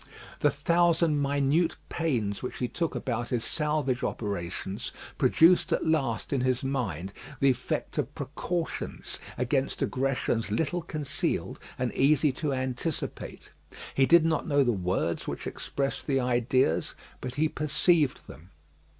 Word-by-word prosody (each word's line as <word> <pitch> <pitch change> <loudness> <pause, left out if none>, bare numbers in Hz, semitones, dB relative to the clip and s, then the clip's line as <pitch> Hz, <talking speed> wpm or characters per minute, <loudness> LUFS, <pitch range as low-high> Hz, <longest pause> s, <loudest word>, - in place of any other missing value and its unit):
The 145 - +4
thousand 165 +1 +2
minute 145 +4 +2
pains 120 -12 -1
which 125 - -5
he 125 - -1
took 165 +5 -2
about 120 -2 -2
his 120 -3 0
salvage 150 -5 0
operations 100 +1 -3 0.3
produced 165 +7 +5
at 165 - +1
last 135 -8 0
in 135 - +1
his 130 0 +1
mind 100 - -2 0.3
the 135 -1 +5
effect 130 0 -3
of - - -2
precautions 175 -2 -4 0.2
against 130 +2 0
aggressions 130 -4 0
little 160 +11 0
concealed, 155 -4 -2 0.2
and 125 -1 -1
easy 145 +1 +4
to 145 +3 -2
anticipate. 130 +3 -4 0.4
He 135 -1 +3
did 170 -1 +6
not 160 -2 +1
know 145 -2 +4
the 120 - +2
words 90 -4 -1
which - - -4
express 135 -1 -3
the 135 -2 0
ideas, 125 -6 +1 0.2
but 125 - -5
he 155 +2 +2
perceived 150 0 +2
them. 80 +8 -13
135 Hz, 135 wpm, -28 LUFS, 120-155 Hz, 0.4 s, did